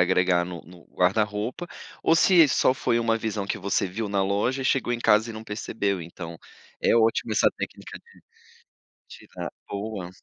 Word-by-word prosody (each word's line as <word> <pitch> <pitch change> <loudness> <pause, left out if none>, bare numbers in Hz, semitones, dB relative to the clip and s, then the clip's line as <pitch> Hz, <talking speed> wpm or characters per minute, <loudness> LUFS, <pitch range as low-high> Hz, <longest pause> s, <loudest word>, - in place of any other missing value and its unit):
agregar 90 0 +3
no 85 -1 -7
no 85 +1 -16
guarda-roupa, 105 - 0 0.3
ou 165 - +3
se 170 -1 +6
só 130 -1 +3
foi 120 -2 0
uma 115 -1 +1
visão 110 -3 -3
que 100 - -3
você 100 0 0
viu 105 +4 -4
na 100 -1 +1
loja, 105 +7 0
e - - -6
chegou 125 -2 +1
em 120 - -2
casa 110 0 +3
e - - -6
não 110 0 -8
percebeu, 105 -3 -2
então 85 0 -8 0.4
é - - +3
ótimo 115 -1 +2
essa - - +4
técnica - - -7
de 465 - -22 0.9
tirar - - -8 0.2
boa. 100 -3 -5
105 Hz, 175 wpm, -25 LUFS, 95-115 Hz, 0.9 s, se